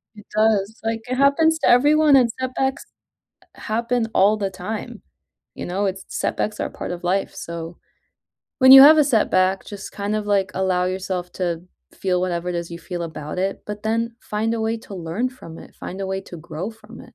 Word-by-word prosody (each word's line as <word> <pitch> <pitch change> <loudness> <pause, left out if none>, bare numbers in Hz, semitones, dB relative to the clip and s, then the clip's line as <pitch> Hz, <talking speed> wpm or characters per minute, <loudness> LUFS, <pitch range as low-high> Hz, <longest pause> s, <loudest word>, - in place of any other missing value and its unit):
It 210 - -14
does, 215 0 +2
like, 225 0 -2
it 255 - 0
happens 315 +4 +3
to - - +1
everyone, 295 +3 +5
and 245 -3 +5
setbacks 260 +1 -2 0.7
happen 235 +1 -1
all 210 +3 +4
the 200 -2 -2
time. 215 +4 -6 0.5
You - - -6
know? 195 +3 -1
It's 195 0 -3
setbacks 210 0 -2
are - - -2
part - - -6
of 175 0 -6
life, 190 +2 0
so 170 0 -7 0.8
when 260 0 +8
you 270 0 +12
have 310 +2 +9
a 300 - +6
setback, 195 -7 +2
just, 200 -2 -9
kind 205 +1 -2
of, 210 -1 -3
like, 195 -2 +1
allow 185 -1 +1
yourself 185 -1 -3
to 175 -2 -2 0.3
feel 180 -2 -1
whatever 180 -1 -2
it 175 - -2
is 170 0 -4
you 170 - -7
feel 175 -1 -6
about 155 0 -6
it, 195 +1 -2
but 210 0 -6
then 230 +1 -1
find 220 +2 -2
a 225 - -3
way 225 +1 0
to 205 -3 -11
learn 180 +8 -2
from 165 -11 -12
it, - - -14
find 190 +2 -8
a 195 - -2
way 190 0 -2
to 175 - -10
grow 170 +5 -6
from 220 0 -17
it. - - -11
205 Hz, 205 wpm, -22 LUFS, 180-230 Hz, 0.8 s, you